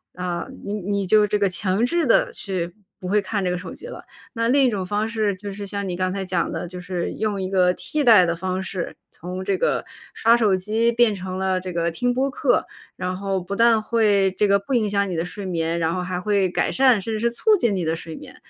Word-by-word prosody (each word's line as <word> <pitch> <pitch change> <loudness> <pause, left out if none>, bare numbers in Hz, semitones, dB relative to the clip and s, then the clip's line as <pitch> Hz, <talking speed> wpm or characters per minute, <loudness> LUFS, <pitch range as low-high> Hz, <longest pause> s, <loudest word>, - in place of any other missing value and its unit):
呃， 180 -1 -3 0.2
你 200 - -3
你 200 0 -2
就 210 +2 +4
这 210 - +1
个 200 - +2
强 190 +4 0
制 340 +5 +1
地 230 - +3
去 180 -3 -4 0.3
不 180 - -6
会 205 +3 +2
看 195 0 -2
这 180 - +1
个 180 - -1
手 180 - -8
机 - - -10
了。 - - -8 0.3
那 230 -1 0
另 275 +3 +4
一 260 - +4
种 205 -5 -2
方 205 +4 -1
式 215 -3 0
就 200 +1 -7
是 200 0 -7
像 200 0 -3
你 180 - -2
刚 185 0 -1
才 195 0 -3
讲 180 -2 -1
的， 175 - -4
就 180 +1 -8
是 180 -1 -3
用 210 -2 -2
一 185 -1 -3
个 180 -2 +4
替 300 +8 -2
代 220 -7 +7
的 170 0 0
方 185 +2 -3
式， 185 -2 -5 0.2
从 180 +2 -6
这 195 - +1
个 - - 0 0.3
刷 230 +1 +4
手 210 -5 +3
机 220 +5 +1
变 235 -2 +3
成 185 -1 -5
了 190 -1 0
这 185 0 -5
个 170 0 0
听 245 +8 0
播 265 +2 0
客， - - +1 0.3
然 185 0 -3
后 195 -1 -2
不 185 +3 -5
但 230 -1 +5
会 210 -4 +2
这 210 - +3
个 200 0 +4
不 200 +7 -5
影 220 -4 +2
响 200 -1 0
你 175 - -3
的 165 - -1
睡 195 +2 -7
眠， 165 -2 -1
然 165 0 0
后 180 - -2
还 180 0 -3
会 200 -1 +1
改 - - 0
善， 255 -6 +4
甚 225 +3 -4
至 215 - -2
是 235 +2 +2
促 425 - +3
进 235 - +1
你 185 - -1
的 160 0 0
睡 165 -1 -8
眠。 - - -11
195 Hz, 275 characters per minute, -22 LUFS, 185-220 Hz, 0.3 s, 代